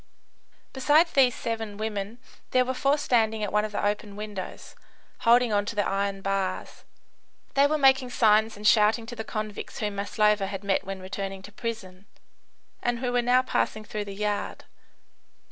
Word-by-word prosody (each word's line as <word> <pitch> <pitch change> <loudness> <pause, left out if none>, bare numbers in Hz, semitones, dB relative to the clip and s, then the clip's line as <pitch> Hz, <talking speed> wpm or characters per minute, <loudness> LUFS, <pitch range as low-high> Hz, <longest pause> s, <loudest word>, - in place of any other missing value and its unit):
Besides 300 +5 +4
these 255 -3 +4
seven 225 -3 -4
women, 215 0 -4 0.3
there 255 0 +3
were 260 - -1
four 275 +3 +2
standing 220 -6 +1
at 205 - -3
one 210 0 +3
of 215 - -4
the 205 - -2
open 205 0 -2
windows, 210 -2 -7 0.5
holding 235 -1 +4
on 205 0 +2
to 230 - -4
the 205 - +1
iron 195 0 -2
bars. 195 -1 -3 0.7
They 280 +1 +5
were 310 +1 +1
making 265 -2 +4
signs 220 -2 +3
and 210 - -9
shouting 215 +1 +4
to 240 +1 -8
the 220 - -5
convicts 215 -2 -5
whom 210 -2 -3
Maslova 210 0 +1
had 195 0 -6
met 195 -1 +1
when 195 -1 -6
returning 195 0 -5
to 205 - -11
prison, 205 -4 -6 0.7
and 240 0 0
who 250 0 -2
were 245 0 +2
now 250 +1 +3
passing 215 -3 -1
through 210 0 -4
the 200 -1 -7
yard. 210 0 -3
215 Hz, 175 wpm, -26 LUFS, 200-240 Hz, 0.7 s, They